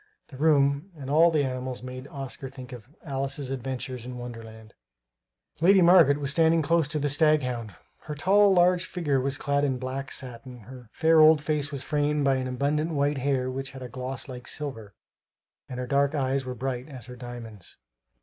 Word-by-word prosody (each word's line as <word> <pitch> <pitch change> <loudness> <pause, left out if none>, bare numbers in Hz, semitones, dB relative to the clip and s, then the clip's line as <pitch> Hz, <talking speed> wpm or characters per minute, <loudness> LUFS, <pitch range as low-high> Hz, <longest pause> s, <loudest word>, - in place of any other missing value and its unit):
The 135 - -11
room 145 +3 +2
and 135 -1 -6
all 165 +3 +6
the 155 -3 +1
animals 130 -1 -4
made 130 +1 -8
Oscar 135 -1 -7
think 130 -2 -11
of 120 0 -11
Alice's 135 -2 -3
Adventures 130 -1 -4
in 125 0 -7
Wonderland. 115 -2 -10 0.9
Lady 185 +3 +5
Margaret 170 -5 +6
was 140 -1 -2
standing 160 +1 +3
close 165 0 +2
to 150 - -3
the 145 0 0
staghound. 135 - +1 0.3
Her 150 - -5
tall, 200 +6 +4
large 180 0 +3
figure 145 -7 -1
was 135 +1 0
clad 140 0 0
in 135 -3 0
black 130 +1 -5
satin; 125 -1 -7
her 125 +1 -13
fair 160 0 +3
old 155 0 +7
face 150 -1 -1
was 140 -2 -5
framed 150 -1 0
by 135 -1 +3
abundant 140 +5 -1
white 145 0 +1
hair 130 -1 0
which 135 +1 -5
had 130 -1 -8
a 125 - -7
gloss 130 +2 -5
like 125 -2 -9
silver; 115 - -5 0.7
and 125 - -6
her 125 - -3
dark 140 +3 +1
eyes 135 -1 0
were 125 0 -5
bright 130 +2 -4
as 130 -5 -9
her 125 0 -10
diamonds. 120 -5 -10
135 Hz, 185 wpm, -26 LUFS, 125-150 Hz, 0.9 s, old